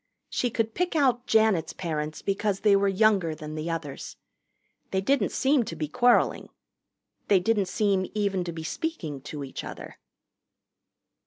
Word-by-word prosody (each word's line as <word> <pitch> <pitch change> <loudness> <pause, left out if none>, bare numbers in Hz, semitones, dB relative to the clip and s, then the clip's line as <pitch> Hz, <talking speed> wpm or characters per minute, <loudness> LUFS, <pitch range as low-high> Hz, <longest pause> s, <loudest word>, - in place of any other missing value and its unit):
She 245 - 0
could 225 -1 -1
pick 360 -1 -1
out 255 -5 +2
Janet's 220 -7 +3
parents 155 -3 -4
because 195 0 -1
they 205 -2 +5
were 200 0 +3
younger 195 -5 +2
than 155 0 -8
the 155 +2 -4
others. 160 -4 -5 0.7
They 190 - 0
didn't 235 +1 +1
seem 270 -1 +2
to 165 - -6
be 155 -1 -3
quarreling. 245 +11 +2 0.8
They 195 - +5
didn't 205 0 +1
seem 195 -1 +1
even 200 -3 0
to 170 - -3
be 160 -1 -7
speaking 160 - -4
to 145 +1 -6
each 135 - -7
other. - - -9
195 Hz, 155 wpm, -27 LUFS, 160-225 Hz, 0.8 s, they